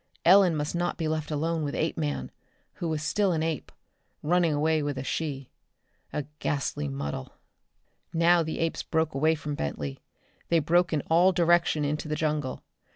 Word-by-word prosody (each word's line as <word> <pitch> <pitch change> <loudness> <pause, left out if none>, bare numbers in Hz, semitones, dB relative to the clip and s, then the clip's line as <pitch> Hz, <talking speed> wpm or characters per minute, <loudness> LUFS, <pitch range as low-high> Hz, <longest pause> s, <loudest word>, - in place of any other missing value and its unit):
Ellen 185 -1 +7
must 150 0 -2
not 175 0 -1
be 160 - -1
left 155 -1 -2
alone 160 +2 -1
with 145 -1 -3
Apeman, 155 -2 -2 0.4
who 170 - -4
was 155 -1 -2
still 195 +2 +1
an 160 -1 0
ape, 160 -2 -3 0.5
running 170 +1 +3
away 155 +1 +2
with 145 -2 -2
a 130 - -3
she. 140 -2 -3 0.6
A 150 - -2 0.2
ghastly 135 - -1
muddle. 70 -1 -5 0.8
Now 170 +1 +4
the 160 -1 -3
apes 165 0 -1
broke 160 -1 0
away 155 +4 +2
from 150 -1 -5
Bentley. 70 - -4 0.5
They 170 - +4
broke 170 +3 +3
in 155 -3 +1
all 175 +5 +4
direction 170 -3 +3
into 150 +2 -2
the 150 - -1
jungle. 150 -4 -2
155 Hz, 165 wpm, -27 LUFS, 145-170 Hz, 0.8 s, Ellen